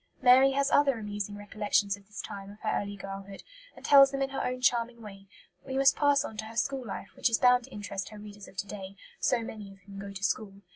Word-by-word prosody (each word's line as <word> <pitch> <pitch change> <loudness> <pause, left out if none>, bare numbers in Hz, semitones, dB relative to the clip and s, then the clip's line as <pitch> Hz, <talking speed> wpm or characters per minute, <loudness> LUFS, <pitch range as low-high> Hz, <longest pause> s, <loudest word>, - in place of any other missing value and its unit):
Mary 260 +1 +6
has 280 +1 +1
other 280 -4 +4
amusing 205 -1 -5
recollections 205 -1 0
of 200 -1 -20
this 210 - -7
time 195 0 -8
of 205 +1 -13
her 215 - -1
early 205 0 -6
girlhood, 195 0 -8 0.3
and - - -12
tells 275 -1 +8
them 275 0 -2
in 270 - -3
her 270 - -2
own 250 0 -2
charming 240 -1 +1
way; 195 -3 -11 0.3
but - - -24
we 265 - -1
must 270 0 +5
pass 285 -1 +3
on 220 - -7
to 220 +1 -5
her 225 +1 -10
school 270 +2 0
life, 200 -3 -7
which - - +2
is 225 - +2
bound 250 -1 +4
to - - -17
interest 200 -3 -5
her 215 - -11
readers 205 -1 -11
of 190 - -17
to 195 - -2
day, 195 -1 -8 0.2
so 240 -2 +1
many 210 -3 -8
of 195 - -15
whom 195 +1 -11
go 200 0 -7
to 195 0 -8
school. 200 +1 -1
210 Hz, 255 wpm, -29 LUFS, 200-250 Hz, 0.3 s, tells